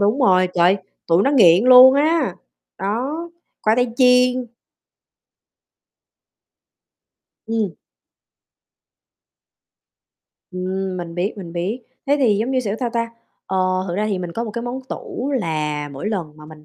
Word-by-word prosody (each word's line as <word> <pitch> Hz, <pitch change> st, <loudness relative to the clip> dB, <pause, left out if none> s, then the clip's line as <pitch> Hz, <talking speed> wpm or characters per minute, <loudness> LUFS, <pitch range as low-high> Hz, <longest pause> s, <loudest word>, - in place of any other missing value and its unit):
đúng 210 Hz, +6 st, +2 dB
rồi, 185 Hz, -6 st, +4 dB
trời 175 Hz, +2 st, +4 dB
ơi, 190 Hz, -2 st, -9 dB, 0.2 s
tụi 170 Hz, +3 st, +3 dB
nó 275 Hz, -, +2 dB
nghiện 200 Hz, -, +5 dB
luôn 255 Hz, +1 st, +9 dB
á, 300 Hz, -, +1 dB, 0.4 s
đó, 260 Hz, -, -3 dB, 0.3 s
khoai 215 Hz, +2 st, +2 dB
tây 245 Hz, -2 st, 0 dB
chiên. 250 Hz, 0 st, +3 dB, 3.0 s
Ừm. 220 Hz, -6 st, -2 dB, 2.8 s
Ừm, 185 Hz, +1 st, -4 dB
mình 170 Hz, -2 st, -6 dB
biết, 180 Hz, +5 st, -1 dB
mình 180 Hz, -4 st, -9 dB
biết, 190 Hz, +9 st, -3 dB, 0.2 s
thế 285 Hz, -, +3 dB
thì 220 Hz, -6 st, +3 dB
giống 225 Hz, +5 st, -1 dB
như, 260 Hz, -1 st, +1 dB
kiểu, 210 Hz, -4 st, -3 dB
sao 240 Hz, -2 st, -1 dB
ta? 230 Hz, 0 st, -2 dB, 0.4 s
Ờ, 190 Hz, -, -3 dB, 0.3 s
thực 175 Hz, -, -3 dB
ra 210 Hz, +1 st, 0 dB
thì 200 Hz, -3 st, -2 dB
mình 175 Hz, -2 st, -5 dB
có 230 Hz, +6 st, -3 dB
một 220 Hz, -, -6 dB
cái 235 Hz, +3 st, -5 dB
món 245 Hz, +2 st, -5 dB
tủ, 270 Hz, +2 st, -5 dB
là 150 Hz, -3 st, -3 dB
mỗi 140 Hz, +10 st, -5 dB
lần 170 Hz, -8 st, -4 dB
mà 150 Hz, 0 st, -13 dB
mình 155 Hz, -1 st, -14 dB
210 Hz, 150 wpm, -20 LUFS, 180-250 Hz, 3.0 s, luôn